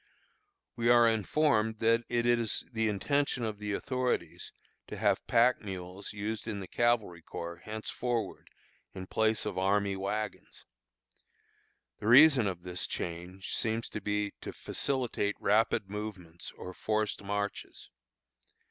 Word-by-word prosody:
We 120 -1 +1
are 120 -1 +7
informed 110 - +2
that 115 +1 +2
it 120 0 +1
is 120 -2 +1
the 110 -1 +1
intention 135 +5 0
of 110 -2 -3
the 105 -1 -3
authorities 125 - -2 0.4
to - - -7
have - - +1
pack 120 +2 +4
mules 95 -1 -6
used 105 +1 -4
in 105 -2 -3
the 95 - -7
cavalry 115 -8 +1
corps 85 +1 -6
henceforward 110 +4 -3 0.5
in 95 -1 -6
place 110 +3 +1
of - - -2
army 100 +1 +2
wagons. 100 +1 -4 1.3
The 105 - -4
reason 130 -2 +8
of 90 -3 -4
this 90 -1 -3
change 90 +3 -5
seems 115 0 -1
to 105 - -5
be 105 -1 -1
to - - -5
facilitate 125 -6 -2
rapid 105 -1 +2
movements 95 -5 -7
or 90 - -7
forced 110 +2 -1
marches. 100 +1 -4
105 Hz, 130 wpm, -31 LUFS, 100-115 Hz, 1.3 s, reason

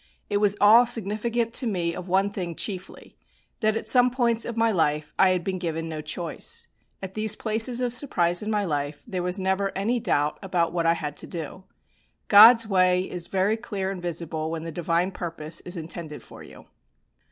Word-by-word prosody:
It 205 - +2
was 205 0 +2
all 225 +4 +6
significant 230 +1 -1
to 250 - 0
me 175 -5 -1
of 180 +1 -8
one 195 +2 +2
thing 175 -4 -5
chiefly, 190 0 -4 0.4
that 215 -1 +1
at - - -6
some 250 -1 +4
points 235 -2 0
of 235 - -6
my 225 0 +2
life 150 -5 -1
I 190 - +6
had 180 -2 0
been 190 0 -3
given 165 -2 -3
no 155 -1 -5
choice. 175 - -3 0.4
At 190 0 -6
these 215 0 +1
places 225 +3 +1
of 245 -2 0
surprise 175 -10 +3
in 210 - -4
my 210 -2 0
life 145 -3 -3
there 185 -1 -4
was 180 +2 0
never 190 +1 -1
any 230 +5 0
doubt 150 -8 0
about 175 -4 -1
what 170 -2 0
I 165 - +5
had 150 -3 -5
to - - -4
do. 170 +2 -7 0.6
God's 225 +3 +8
way 185 -3 +2
is 175 -1 -5
very 195 +3 0
clear 200 -4 -4
and 190 -2 -7
visible 165 -2 -4
when 160 -1 -5
the 165 - -6
Divine 170 +3 -1
purpose 165 -3 -5
is 180 +1 -4
intended 160 -1 -6
for - - -13
you. - - -13
190 Hz, 200 wpm, -25 LUFS, 170-220 Hz, 0.6 s, God's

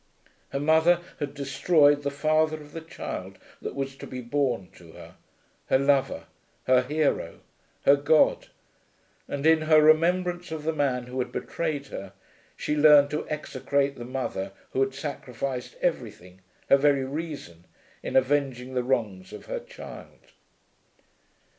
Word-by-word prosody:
Her 140 - -3
mother 160 +4 +4 0.2
had 145 0 -4
destroyed 145 +1 +3
the 140 - -1
father 155 +2 +1
of 150 -1 -13
the 165 - -7
child 95 - -7 0.2
that - - -5
was 135 -1 -3
to - - -9
be 130 - -6
born 125 -6 -1
to 85 -2 -16
her, - - -12 0.5
her - - +4
lover, 135 - +1 0.4
her 130 0 +4
hero, 150 +3 -1 0.4
her 140 - +7
god; 145 +2 +3 0.8
and 140 +1 -4
in 160 0 +5
her 155 0 +5
remembrance 175 +3 +3
of 160 -2 -5
the 160 +1 0
man 135 -5 0
who 125 +1 -6
had 125 - -2
betrayed 155 -4 -3
her, 100 -1 -7 0.4
she 150 - -1
learned 145 -1 +6
to 150 - -3
execrate 140 -2 -1
the 120 - -8
mother 120 -6 -4 0.2
who - - -2
had 135 0 0
sacrificed 130 -3 -5
everything, 90 +1 -3 0.3
her 140 - +6
very 140 -1 +2
reason, 140 - -6 0.4
in - - -5
avenging 130 -1 +1
the 125 - +1
wrongs 110 -7 -2
of - - -10
her - - -4
child! - - -12
140 Hz, 145 wpm, -26 LUFS, 130-155 Hz, 0.8 s, her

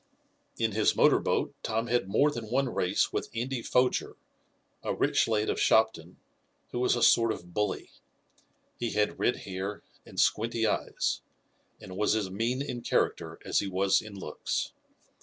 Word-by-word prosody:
In 115 -1 +1
his 105 +1 +2
motor - - +5
boat - - 0
Tom 115 +1 -1
had 120 -4 0
more 140 +9 +3
than 115 -5 -6
one 130 0 0
race 90 - +1
with - - -2
Andy 125 +2 -2
Foger, 125 +2 +1 0.7
a - - -2
rich - - +2
lad 110 -1 +1
of - - -1
Shopton, 100 -6 +2 0.5
who 120 - -3
was 125 - +3
a 120 - 0
sort 115 -1 +5
of 90 -4 -8
bully. 105 +2 -2 0.9
He 120 -1 -2
had 105 0 0
red 125 - +2
hair 95 +2 -5 0.2
and - - -8
squinty 115 +1 +2
eyes, - - -1 0.6
and 95 - -10
was 105 +2 +2
as 100 -4 -1
mean 120 +7 -1
in 125 -4 -5
character - - 0
as - - +2
he 100 - -2
was 95 +1 +2
in 110 -2 -10
looks. 95 - -3
110 Hz, 165 wpm, -29 LUFS, 100-120 Hz, 0.9 s, motor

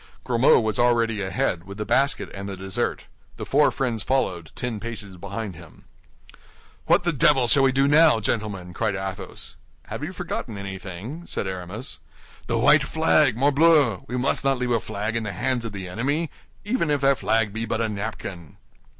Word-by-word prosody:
Grimaud 120 +1 +4
was 110 +2 -1
already 115 -3 +2
ahead, 95 -2 -1
with 100 +1 -9
the 105 - -3
basket 140 +4 +1
and 100 0 -6
the 95 - -6
dessert. 95 0 -2 0.3
The - - -5
four 145 +2 +4
friends 125 -6 -2
followed, 90 -12 -1
ten 120 -4 -3
paces 105 -4 -5
behind 100 +1 -6
him. 80 -2 -15 1.0
"What - - +4
the 175 - +1
devil 135 -1 +4
shall 135 +4 +4
we 135 -1 +4
do 135 +1 +2
now, 150 -4 +6
gentlemen?" 100 -5 -3
cried 100 - -1
Athos. 95 0 -6 0.3
"Have - - -5
you - - -3
forgotten 110 - -5
anything?" 100 - -7
said - - -2
Aramis. 95 - -6 0.5
"The 115 - 0
white 145 +6 +5
flag, 150 -4 +3
morbleu! 145 - +4
We 125 - -3
must 130 +3 0
not 135 -1 +2
leave 125 0 -2
a 115 - +3
flag 105 +2 -4
in 115 - 0
the 105 -3 -4
hands 120 +5 -1
of 115 - -4
the 95 -2 -6
enemy, 140 - -1 0.3
even 210 -7 0
if 145 -1 +1
that 135 -1 +3
flag 110 -2 +1
be 115 +1 -3
but 110 - -2
a 115 - +1
napkin." 100 -6 -6
115 Hz, 185 wpm, -24 LUFS, 100-135 Hz, 1.0 s, now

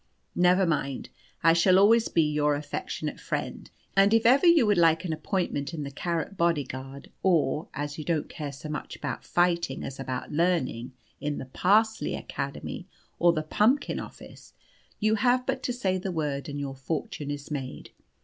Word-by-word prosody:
Never 180 +2 +4
mind, 140 -5 -2 0.3
I 165 0 +6
shall 180 +2 +5
always 225 +4 +5
be 165 - +2
your 150 -1 +1
affectionate 145 0 -4
friend, - - -4 0.3
and 200 +3 +5
if 225 - +2
ever 270 +9 +6
you 335 -7 +6
would 205 -4 +3
like 165 +1 +4
an 165 - -1
appointment 155 -2 -2
in 150 - -4
the 140 - -6
Carrot 170 +6 -3
bodyguard, 140 -5 -2
or 160 -4 +2
(as 145 +1 -4
you - - -4
don't 160 -2 -1
care 150 -4 -6
so 140 +3 -9
much 150 -1 -5
about 140 -5 -5
fighting 170 -5 +1
as 135 - -7
about 130 -2 -4
learning) 145 -7 0 0.3
in 145 0 -2
the - - -5
Parsley 215 - +2
Academy - - -5 0.3
or 175 0 +5
the 155 -2 -2
Pumpkin 220 - +1
Office, - - -11 0.5
you 215 +1 +2
have 245 +3 +2
but 265 0 -1
to 255 - -2
say 190 -7 -1
the 185 +1 -3
word 150 -5 -2
and 145 0 -4
your 140 -1 -4
fortune 145 +1 -4
is 145 +1 -6
made. 135 -3 -5
165 Hz, 175 wpm, -27 LUFS, 145-190 Hz, 0.5 s, I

